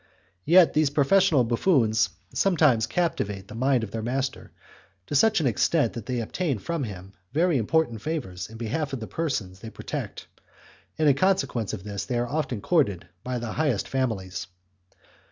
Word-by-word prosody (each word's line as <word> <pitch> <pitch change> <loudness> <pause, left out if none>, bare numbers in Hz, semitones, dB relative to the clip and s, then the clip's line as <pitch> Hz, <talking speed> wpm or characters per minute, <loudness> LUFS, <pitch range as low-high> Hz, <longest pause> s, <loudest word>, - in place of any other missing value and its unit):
Yet 175 0 +6
these 155 -2 +3
professional 150 +1 +4
buffoons 115 - +2 0.2
sometimes 150 - +3
captivate 100 - -2
the - - -10
mind 130 +1 +1
of 105 - -5
their 115 - -3
master 130 +3 -3 0.5
to - - -7
such 215 +9 +4
an 155 - 0
extent 130 +3 +2
that 115 -3 -7
they 125 -2 -1
obtain 140 +4 -2
from 155 - -3
him 95 -2 -9 0.2
very 165 -2 +2
important 120 -2 +1
favours 110 - -4
in 115 - -10
behalf 135 +6 -3
of 135 - -2
the 110 - -5
persons 110 - -3
they 110 - -8
protect, - - -6 0.7
and 155 -1 +2
the 140 - +7
consequence 135 - +1
is 95 - -10
that 100 -1 -5
they 120 - +1
are 120 0 0
often 140 -6 -2
courted 130 - +1
by 125 0 -3
the 120 -2 -4
highest 145 -9 0
families. 110 -10 -2
125 Hz, 170 wpm, -26 LUFS, 110-155 Hz, 0.7 s, the